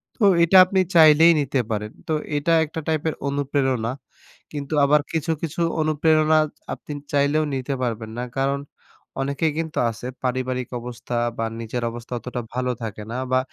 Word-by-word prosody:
তো 225 - -3 0.2
এটা 185 +3 +5
আপনি 190 +1 0 0.2
চাইলেই 160 +1 +8
নিতে 135 -2 0
পারেন। 105 0 -2 0.2
তো 160 - 0 0.2
এটা 165 +3 +1
একটা 160 +2 -6
টাইপের 160 0 0
অনুপ্রেরণা। 135 -4 0 0.6
কিন্তু 145 0 -5
আবার 150 +1 +4
কিছু, 160 0 -1
কিছু 165 +1 -3 0.2
অনুপ্রেরণা 155 0 +3
এচ 150 - -11 0.2
আপনি 150 - -8 0.2
চাইলেও 145 +2 +2
নিতে 135 +1 -3
পারবেন 115 -2 -3
না। 125 - -2
কারণ 140 +1 +1 0.6
অনেকেই 140 +3 0
কিন্তু 160 -1 -3
আছে 115 +2 -7 0.2
পারিবারিক 130 -1 -2
অবস্থা 120 0 -6 0.2
বা, 115 - -1
নিজের 115 +2 -4
অবস্থা 120 +1 -8
অতটা 125 +1 -5
ভালো 125 0 -1
থাকে 105 -1 -5
না 125 - -3
বা, 130 - +4
140 Hz, 160 wpm, -23 LUFS, 125-155 Hz, 0.6 s, চাইলেই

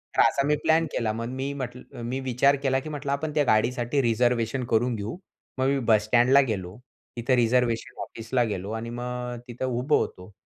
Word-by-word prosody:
तर - - +5
असा 140 0 +3
मी 150 - +3
प्लॅन 160 +1 +4
केला 110 -3 -1
मग 115 +1 -4
मी 140 +1 -2
म्हटलं, 125 -2 -7
मी 125 +3 -3
विचार 130 +2 +3
केला 130 -1 +2
की 155 - -8
म्हटलं, 145 -2 -4
"आपण 150 +2 -2
त्या 150 - +4
गाडीसाठी 120 +4 +2
रिझर्वेशन 120 +1 +1
करून 120 +1 +2
घेऊ." 105 - -5 0.4
मग 130 +1 +1
मी 140 0 +2
बस 105 -1 +5
स्टँडला 125 +4 +5
गेलो, 95 -1 -4 0.4
तिथं 125 +2 +2
रिझर्वेशन 120 -1 +1
ऑफिसला 120 +2 -2
गेलो 100 -2 -3
आणि 115 +1 -6
मग 125 0 -4
अ, - - -6
तिथं 125 +1 -4
उभं 130 +4 +1
होतो. 90 +3 -4
125 Hz, 195 wpm, -26 LUFS, 115-135 Hz, 0.4 s, तर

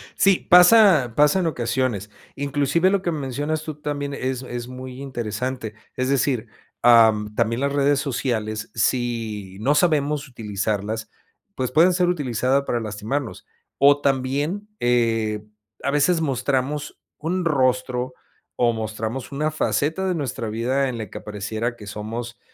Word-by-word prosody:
Sí, 195 -2 +3
pasa 180 - +7
pasa 150 +5 +4
en 180 - +1
ocasiones. 120 - -1 0.3
Inclusive, 145 +5 +1
lo 200 0 +1
que 175 -2 -1
mencionas 145 +2 -2
tú 155 -1 -6
también 145 -1 -4
es 130 -1 -3
es 120 -1 -6
muy 130 +1 -8
interesante. 120 -2 -4 0.2
Es 130 +1 -1
decir, 130 -4 +1 0.4
em, 110 -3 +5
también 115 +2 0
las 140 0 0
redes 140 0 +3
sociales, 110 -6 -2
si 110 -4 -1
no 140 +5 +2
sabemos 150 -3 +1
utilizarlas, 110 -2 -3 0.5
pues 130 -1 -2
pueden 170 +6 +5
ser 180 0 +2
utilizadas 135 -4 +1
para 120 - 0
lastimarnos. 110 +5 -4 0.3
O, 145 +1 +5
también, 140 +9 -1
eh, 115 -3 +1 0.4
a 140 - 0
veces 155 +4 +2
mostramos 140 +1 -1 0.2
un 175 +4 -2
rostro, 130 -3 +1 0.4
o 120 -1 +3
mostramos 110 +4 -4
una 150 +3 -1
faceta 160 +4 0
de 185 - 0
nuestra 125 -7 -3
vida 130 +5 0
en 125 - -4
la 110 -4 -6
que - - -8
apareciera 110 +3 -4
que 105 -3 -12
somos 115 +3 -6
130 Hz, 140 wpm, -23 LUFS, 115-145 Hz, 0.5 s, pasa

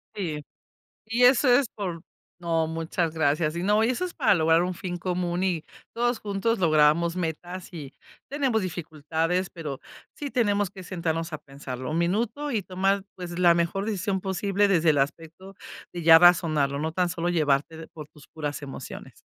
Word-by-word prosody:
Sí. 155 -7 -4 0.6
Y 235 +3 +2
eso 255 +1 +5
es 245 +1 +5
por 180 -6 -4 0.4
No, 165 -2 0
muchas 165 0 -2
gracias. 155 0 +1
Y 175 - -2
no 210 +3 +3
y 235 - +2
eso 360 +9 -1
es 350 - -9
para - - +3
lograr 165 0 +3
un 180 +1 -1
fin 175 0 -5
común 180 0 -2
y, 175 -4 0 0.3
todos 240 0 0
juntos, 210 +2 -1
logramos 160 0 +3
metas 175 +1 -5
y 145 -4 -8 0.4
tenemos 265 -7 0
dificultades, 165 +1 -2
pero 150 -6 -6 0.4
sí 285 -2 -5
tenemos 205 -5 +1
que 190 -1 -11
sentarnos 165 -2 -3
a - - -4
pensarlo 130 -2 -7
1 160 - -1
minuto, 225 +11 -1
y 220 -6 -1
tomar, 195 +2 0
pues, 175 -1 -7
la 175 -1 +6
mejor 170 +4 0
decisión 195 -2 -2
posible 200 +1 +1
desde 170 -4 +2
el 145 - +2
aspecto 165 +7 -4 0.4
de 175 - -5
ya 165 0 +9
razonarlo, 155 -5 +4
no 160 +2 -2
tan 180 0 0
solo 175 0 -2
llevarte 160 -1 0
por 155 -2 -10
tus 150 -2 -18
puras 145 -2 -5
emociones. 135 -2 -9
175 Hz, 175 wpm, -26 LUFS, 160-195 Hz, 0.6 s, ya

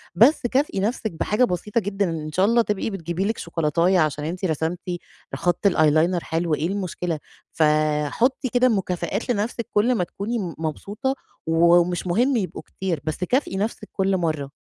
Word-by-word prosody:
بس 240 - +6
كافئي 265 -4 0
نَفسِك 220 +2 -1
بحاجة 210 +8 0
بسيطة 210 +1 0
جدًا، 200 -1 -1
إن 155 -2 -4
شاء 185 +5 +3
الله 235 +3 +4
تبقي 210 -1 -1
بتجيبي 175 -1 -3
لِك 220 +2 -1
شوكولاتاية 170 +3 +1
عشان 150 -1 0
أنتِ 180 +4 -3
رسمتِ 160 +1 -1 0.6
خَط 175 +3 +1
الeyeliner 165 0 +3
حلو، 165 0 -1
إيه 155 +2 -1
المشكلة؟ 180 -4 -3 0.3
ف 160 - +1 0.4
حُطّي 250 - 0
كده 250 +1 +3
مكافآت 190 0 -2
لنَفسِك 230 +1 -1
كلّ 235 +5 +3
ما 180 - +1
تكوني 205 +7 -4
م 180 -5 -4
مبسوطة، 205 - -3 0.3
ومش 170 +2 +3
مهِم 245 +10 +2
يبقوا 190 -4 -3
كتير، 180 -6 -4
بس 155 +4 -3
كافئي 245 -2 0
نَفسِك 210 +1 -3
كلّ 195 -1 +1
مرّة. 155 -5 -2
185 Hz, 165 wpm, -23 LUFS, 165-215 Hz, 0.6 s, بس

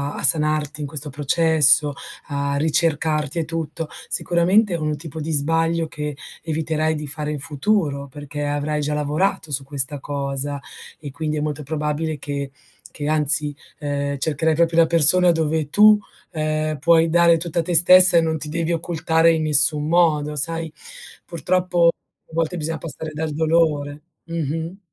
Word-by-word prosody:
a - - -6
sanarti 155 0 +1
in 145 - -3
questo 150 0 -5
processo, 145 -1 +3 0.3
a 140 -1 -2
ricercarti 155 0 0
e 165 - -1
tutto, 165 0 -5 0.2
sicuramente 180 +4 +2
è - - 0
un 155 -2 -2
tipo 160 +1 -8
di 160 +2 -4
sbaglio 165 +2 0
che 150 -1 -5 0.3
eviterai 160 0 -1
di 150 0 -5
fare 150 +1 -4
in 150 - -4
futuro 145 -1 -1
perché 145 +1 -6
avrai 145 +1 -2
già 150 +1 -2
lavorato 150 +2 -1
su 135 0 -1
questa 140 +1 -2
cosa 140 0 -4 0.4
e 145 -2 -8
quindi 155 +1 -3
è - - -1
molto 150 0 -3
probabile 150 +1 -3
che 140 0 -5 0.4
che 145 - -5
anzi, 150 -1 +1 0.2
ehm, 140 -1 -3
cercherai 155 +2 0
proprio 165 +1 +2
la 165 - +5
persona 170 +2 +4
dove 160 -2 -1
tu, 210 +4 +6 0.3
ehm, 155 -1 -2
puoi 165 +2 +4
dare 170 0 +4
tutta 170 0 -2
te 175 +1 -2
stessa 180 +1 +7
e - - +5
non 160 -1 -1
ti 150 0 -4
devi 165 +1 -2
occultare 165 0 +1
in 160 -1 0
nessun 150 0 +3
modo, 155 -3 +2
sai, 165 +2 -3 0.5
purtroppo 175 +1 +1
a 170 - -10
volte 165 +2 -1
bisogna 160 0 -3
passare 160 -1 -7
dal 155 +1 -3
dolore. 150 -2 0 0.2
Mh-mh. 165 +2 -4
155 Hz, 160 wpm, -21 LUFS, 145-165 Hz, 0.5 s, stessa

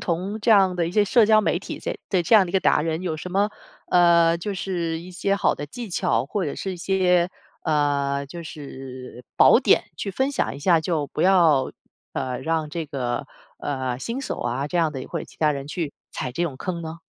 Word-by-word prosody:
同 190 +5 -2
这 225 - +1
样 195 -4 +5
的 170 -2 0
一 - - -4
些 205 +2 +3
社 225 +2 +4
交 215 0 +5
媒 - - +1
体 - - -7
这 - - -4
这 185 -3 +2
这 170 - +3
样 195 -4 +7
的 - - -9
一 - - -12
个 - - +5
达 150 - +3
人， 160 +2 -2
有 170 -4 -2
什 180 +3 -7
么 200 +3 +1 0.4
呃， 170 -1 +5
就 200 +3 -4
是 170 -3 -2
一 180 +2 -10
些 195 +2 0
好 - - +2
的 145 - -6
技 230 +6 -8
巧 115 -7 +1
或 195 +7 -3
者 145 - -2
是 190 - -4
一 - - -6
些 180 -1 +2 0.4
呃， 140 -2 +1
就 170 +5 -8
是 130 -5 -9
宝 - - +7
典 - - +4
去 200 - -3
分 265 +8 0
享 240 - -1
一 - - -8
下， 165 +2 +3
就 155 -3 -1
不 - - -5
要， 170 -8 +4 0.4
呃， 125 -1 -2
让 160 0 -1
这 165 -1 -4
个， 130 -1 -3 0.3
呃， 130 -3 -3
新 230 - -4
手 - - -4
啊 125 +4 -2
这 175 +3 -2
样 160 -2 +2
的， 135 -3 -6
或 - - -4
者 - - -6
其 - - -19
他 150 -1 +3
人 140 0 -5
去 155 -1 -4 0.2
踩 125 - -4
这 170 - -2
种 145 -7 -2
坑 170 +3 -4
呢？ 160 0 -7
170 Hz, 250 characters per minute, -24 LUFS, 145-185 Hz, 0.4 s, 样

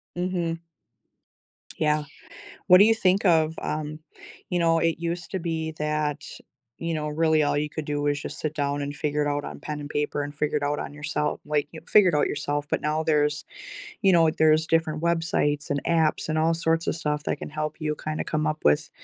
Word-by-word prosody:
Mhm. 175 -2 -2 1.2
Yeah. 150 -1 +2 0.6
What 180 -2 +8
do 200 - +8
you 225 +1 +5
think 195 -2 +2
of, 160 -3 +3
um 155 0 -4 0.5
You 180 - +1
know, 165 -1 +3
it 165 -1 +1
used 170 +2 -4
to 190 - -1
be 160 -2 -3
that, 150 -1 -1 0.5
you 165 0 -2
know, 150 -1 -2
really 160 0 +2
all 145 0 +1
you 150 0 -1
could 155 0 -5
do 145 0 -2
was 145 -1 0
just - - -6
sit 155 -1 -2
down 145 -1 -1
and 145 0 -4
figure 150 0 -1
it 145 - 0
out 145 0 -1
on - - -7
pen 150 -1 -5
and 145 - -7
paper 145 0 -1
and 145 0 -6
figure 150 0 -1
it - - -10
out 145 +1 0
on - - -5
yoursel 150 +1 -2
like, 150 -1 0
you 160 - -9
figure 205 -4 +6
it - - -3
out 150 - +3
yourself, 145 0 -2
but - - 0
now 155 +1 0
there's 150 -2 +1 0.6
you 195 -3 +5
know, 165 -2 +5
there's 155 0 +4
different 160 -2 +1
websites, 165 -3 0
and 145 -1 -1
apps, 160 -2 +1
and 155 - 0
all 160 +1 +3
sorts 165 0 0
of - - +1
stuff 150 -2 -2
that - - -1
can - - -6
help 155 0 -3
you 150 -1 -1
kinda 155 0 -4
come 155 0 -1
up 155 0 -1
with 75 0 +3
155 Hz, 215 wpm, -25 LUFS, 150-165 Hz, 1.2 s, What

